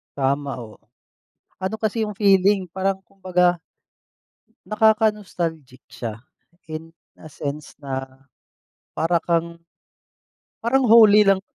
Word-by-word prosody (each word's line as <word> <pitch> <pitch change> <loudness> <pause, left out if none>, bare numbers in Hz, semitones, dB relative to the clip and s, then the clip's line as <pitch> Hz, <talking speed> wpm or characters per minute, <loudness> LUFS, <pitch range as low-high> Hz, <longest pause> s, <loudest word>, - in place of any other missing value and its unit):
Tama 140 +1 -1
ho. 110 -2 -12 0.8
Ano 190 +3 -2
kasi 220 0 -1
yung 210 - -6
feeling, 195 -2 +3
parang 190 +1 -2
kumbaga 180 -2 0 1.1
nakaka-nostalgic 210 - 0
siya 115 -2 -7 0.5
in 160 +1 -7 0.2
a 155 - -14
sense 145 +1 -6
na 135 -2 -4 0.9
para 165 +2 0
kang 170 -1 -1 1.1
parang 255 +2 +2
holy 215 -2 +7
lang 195 -1 +3
185 Hz, 100 wpm, -22 LUFS, 155-210 Hz, 1.1 s, holy